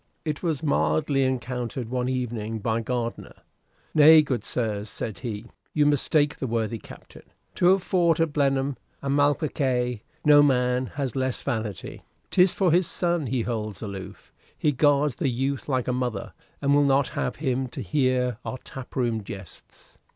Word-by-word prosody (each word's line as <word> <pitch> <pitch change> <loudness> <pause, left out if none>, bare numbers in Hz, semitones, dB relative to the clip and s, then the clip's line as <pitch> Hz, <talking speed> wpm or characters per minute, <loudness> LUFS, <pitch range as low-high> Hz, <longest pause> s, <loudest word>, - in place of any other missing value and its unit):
It 150 -2 -2
was 165 -4 -1
mildly 80 - +1
encountered 125 -1 -3
one 125 0 -1
evening 115 -4 -3
by 110 +1 -1
Gardiner, 120 0 -4 0.5
"Nay, 155 +1 +8
good 125 -7 -2
sirs," 110 -4 -2
said 110 0 -5
he, 115 -3 -5 0.3
"you 150 -1 +4
mistake 145 +1 +2
the 135 - -3
worthy 115 -1 -1
Captain. - - -13 0.4
To 175 - +4
have 190 0 +4
fought 170 -4 +2
at 165 -2 +1
Blenheim 135 -1 +1 0.3
and 140 0 0
Malplaquet, 130 -5 +1 0.2
no 145 -1 +8
man 125 -2 +2
has 135 -3 -2
less 130 -2 -1
vanity. 110 -4 -4 0.3
'Tis 180 -1 +4
for 185 -4 +2
his 175 +1 +3
son 170 -5 0
he 125 -1 0
holds 110 -3 -4
aloof. 100 -2 -8 0.2
He 150 - +2
guards 145 0 +2
the 135 - 0
youth 135 +3 -2
like 130 -3 0
a 125 - +1
mother, 125 -5 -3 0.3
and 140 0 +3
will 145 - +5
not 140 -1 +3
have - - -2
him 130 -3 -1
to - - -7
hear 130 -5 +1
our 130 - -4
tap 130 -1 -10
room 115 -4 0
jests. 95 -3 -12
130 Hz, 165 wpm, -25 LUFS, 115-145 Hz, 0.5 s, Nay